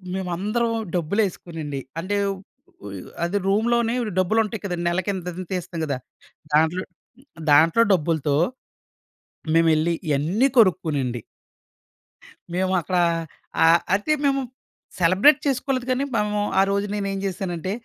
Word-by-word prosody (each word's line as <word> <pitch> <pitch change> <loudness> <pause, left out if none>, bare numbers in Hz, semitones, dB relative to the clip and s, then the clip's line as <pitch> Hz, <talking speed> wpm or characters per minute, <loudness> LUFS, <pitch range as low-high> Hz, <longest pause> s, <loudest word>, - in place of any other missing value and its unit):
మేమందరం 205 +6 -1 0.2
డబ్బులేసుకోనండి 170 -5 -2 0.2
అంటే 205 +3 -1 0.7
ఉ - - -6
యహ్! - - -12
అది 180 +4 0
రూమ్‌లోనే 230 +3 +2 0.3
డబ్బులుంటాయి 215 +3 +1
కదండీ. 175 -3 -3
నెలకి 185 +3 -1
ఇంతింత 180 0 -5
తిస్తాం 175 -2 -4
గదా! 140 -3 -2 0.6
దాంట్లో 160 +4 +3 0.7
దాంట్లో 160 +9 +6
డబ్బులతో 155 -4 +1 1.2
మేమెళ్ళి 165 0 +3 0.2
ఇయన్ని 165 - +2
కొనుక్కునండి... 150 - +2 1.3
మేమక్కడా 185 -1 +1 0.6
ఆహ్, 165 +1 +6
అయితే 210 +10 +2
మేము 275 -1 +2 0.6
సెలబ్రేట్ 190 - +5
చేసుకోలేదు 260 -1 -1
గానీ 255 +2 +1
మేము 210 -1 0 0.2
ఆ - - +7
రోజు 200 +1 0
నేనేం 195 -1 -2
జేశానంటే 185 -1 -3
185 Hz, 105 wpm, -23 LUFS, 165-210 Hz, 1.3 s, ఆ